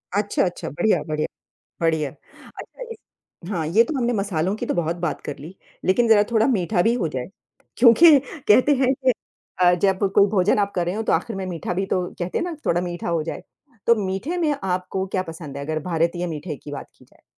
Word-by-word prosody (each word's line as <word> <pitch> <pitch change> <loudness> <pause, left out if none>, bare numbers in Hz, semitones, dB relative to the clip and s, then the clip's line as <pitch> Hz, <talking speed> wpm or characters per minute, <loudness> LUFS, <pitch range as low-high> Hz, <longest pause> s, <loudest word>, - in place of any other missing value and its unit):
अच्छा, 205 0 +1
अच्छा, 180 - -4
बढ़िया, 215 - +1
बढ़िया, 155 0 -1 0.5
बढ़िया। 160 -3 +1
अच्छा 145 - -14
इस - - -10 0.5
हाँ, 170 -6 -2
ये 190 +9 +5
तो 290 - -4
हमने 245 -1 +1
मसालों 195 -4 -1
की - - -4
तो - - -1
बहुत 170 -1 -1
बात 170 -3 -2
कर 145 - -5
ली, 160 +6 -10 0.3
लेकिन 230 +5 +3
ज़रा 215 -2 +6
थोड़ा 225 0 +4
मीठा 195 -6 +1
भी 225 - +3
हो 200 -9 -1
जाए, 130 -4 -4 0.5
क्योंकि 280 +6 +7 0.3
कहते 250 +7 +6
हैं 260 -1 +3
कि 255 - +5 0.5
अ, 180 0 +6
जब 195 -1 +3 0.2
कोई 200 - +6
भोजन 200 0 +2
आप 200 -1 0
कर 175 -1 0
रहे 175 - -1
हो 220 - -2
तो - - 0
आखिर 225 - -1
में 190 - -3
मीठा 180 -1 -4
भी 190 +2 -1
तो 185 -2 0
कहते 175 0 -2
हैं - - -1
ना 350 -1 -4
थोड़ा 170 - +2
मीठा 175 -1 -4
हो 170 -2 0
जाए, 165 - -6 0.4
तो 235 - +6
मीठे 195 - -3
में 310 -4 +1
आपको 185 0 -2
क्या 185 -1 -1
पसंद 160 -5 -9
है? 140 - -5
अगर 155 +1 -2
भारतीय 170 +1 -1
मीठे 155 -1 -5
की 145 - -11
बात - - -6
की - - -19
जाए। - - -27
185 Hz, 220 wpm, -22 LUFS, 165-220 Hz, 0.5 s, क्योंकि